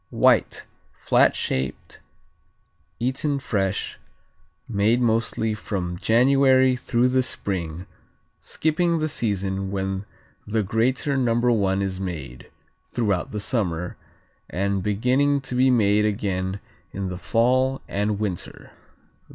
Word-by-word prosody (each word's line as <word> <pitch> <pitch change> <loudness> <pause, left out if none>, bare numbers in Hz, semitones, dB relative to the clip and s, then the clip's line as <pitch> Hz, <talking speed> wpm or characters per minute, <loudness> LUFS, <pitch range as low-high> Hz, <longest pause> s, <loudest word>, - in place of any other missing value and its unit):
White; - - +2 0.3
flat - - +3
shaped; 65 0 -3 1.0
eaten 135 +4 0
fresh; 100 -7 -2 0.7
made 110 +2 +2
mostly 115 -1 0
from 90 -5 -4
January 130 +3 +4
through 125 0 +1
the 130 +1 +3
Spring, 90 -8 -3 0.5
skipping 170 +2 0
the 155 0 0
season 100 -8 -2
when 95 0 -3 0.4
the 110 +1 0
greater 125 +7 0
No. 120 -4 +2
I 95 - +1
is 95 -1 -2
made 75 -10 -6 0.4
(throughout 100 -7 0
the 105 - -4
summer) 90 -6 -2 0.5
and 100 +1 -1
beginning 125 +8 +2
to 130 - -7
be 130 +1 +4
made 105 -4 +3
again 95 -2 -2 0.3
in 95 -1 -4
the 90 - -5
fall 130 +6 +2
and 105 +1 -1
winter. 100 -5 -5
105 Hz, 110 wpm, -24 LUFS, 95-125 Hz, 1.0 s, January